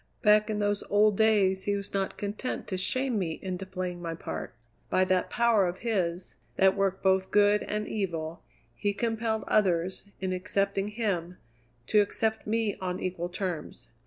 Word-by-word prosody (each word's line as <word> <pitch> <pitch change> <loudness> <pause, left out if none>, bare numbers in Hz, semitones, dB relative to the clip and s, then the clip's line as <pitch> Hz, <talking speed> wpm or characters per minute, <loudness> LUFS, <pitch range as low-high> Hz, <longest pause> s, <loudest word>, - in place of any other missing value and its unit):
Back 210 0 +5
in 215 - -1
those 205 -1 0
old 210 0 +4
days 195 -3 +3
he 205 - +1
was 200 0 -5
not 195 -1 -1
content 210 +5 -3
to 190 - -1
shame 245 +5 0
me 165 -4 -2
into 190 0 -4
playing 180 -2 -4
my 165 -1 -4
part; 80 - -6 0.3
by 185 - +3
that 185 -1 +1
power 230 -5 +3
of 175 +1 -3
his, 185 -5 -1 0.2
that 190 0 +4
worked 195 -1 0
both 190 0 +3
good 205 0 +4
and 210 0 -3
evil, 170 -5 -3 0.3
he 205 +10 0
compelled 225 0 -1
others, 185 -3 +1
in 185 -1 -1
accepting 195 +1 0
him, 195 -5 -2 0.5
to 210 - +4
accept 220 +2 -1
me 220 -1 0
on 185 -2 -3
equal 175 -1 -3
terms. 175 - -5
195 Hz, 165 wpm, -28 LUFS, 185-210 Hz, 0.5 s, Back